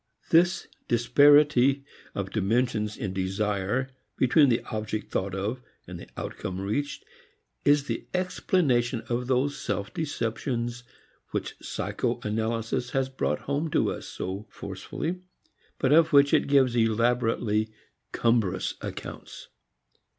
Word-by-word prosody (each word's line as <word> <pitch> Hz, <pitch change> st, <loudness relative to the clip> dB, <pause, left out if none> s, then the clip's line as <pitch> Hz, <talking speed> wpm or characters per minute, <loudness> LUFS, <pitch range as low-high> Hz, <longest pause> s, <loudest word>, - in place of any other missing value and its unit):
This 175 Hz, +3 st, +4 dB, 0.2 s
disparity 140 Hz, +2 st, +5 dB, 0.3 s
of 95 Hz, -1 st, -3 dB
dimensions 110 Hz, 0 st, 0 dB
in 100 Hz, -7 st, -3 dB
desire 100 Hz, +6 st, -1 dB, 0.3 s
between 135 Hz, +3 st, +5 dB
the 115 Hz, -, +1 dB
object 110 Hz, -1 st, -3 dB
thought 95 Hz, 0 st, -1 dB
of 105 Hz, +6 st, -3 dB, 0.2 s
and -, -, -8 dB
the -, -, -10 dB
outcome 95 Hz, 0 st, -5 dB
reached 110 Hz, +10 st, -3 dB, 0.6 s
is 145 Hz, 0 st, +5 dB
the -, -, -4 dB
explanation 140 Hz, -10 st, +1 dB
of 120 Hz, +1 st, -1 dB
those 135 Hz, +2 st, +1 dB
self 100 Hz, -7 st, -3 dB
deceptions 120 Hz, -5 st, -2 dB, 0.5 s
which -, -, -3 dB
psycho -, -, -2 dB
analysis 115 Hz, +3 st, -1 dB
has 135 Hz, 0 st, 0 dB
brought 135 Hz, -, -1 dB
home 145 Hz, +3 st, -1 dB
to -, -, +2 dB
us -, -, -6 dB
so 95 Hz, +4 st, -5 dB
forcibly, 175 Hz, -, -5 dB, 0.6 s
but 130 Hz, -, +1 dB
of 160 Hz, 0 st, +5 dB
which 140 Hz, 0 st, +6 dB
it -, -, +4 dB
gives 135 Hz, -3 st, +4 dB
elaborately 115 Hz, -1 st, +1 dB, 0.4 s
cumbrous 115 Hz, -6 st, +1 dB
accounts. -, -, -8 dB
120 Hz, 120 wpm, -27 LUFS, 110-140 Hz, 0.6 s, which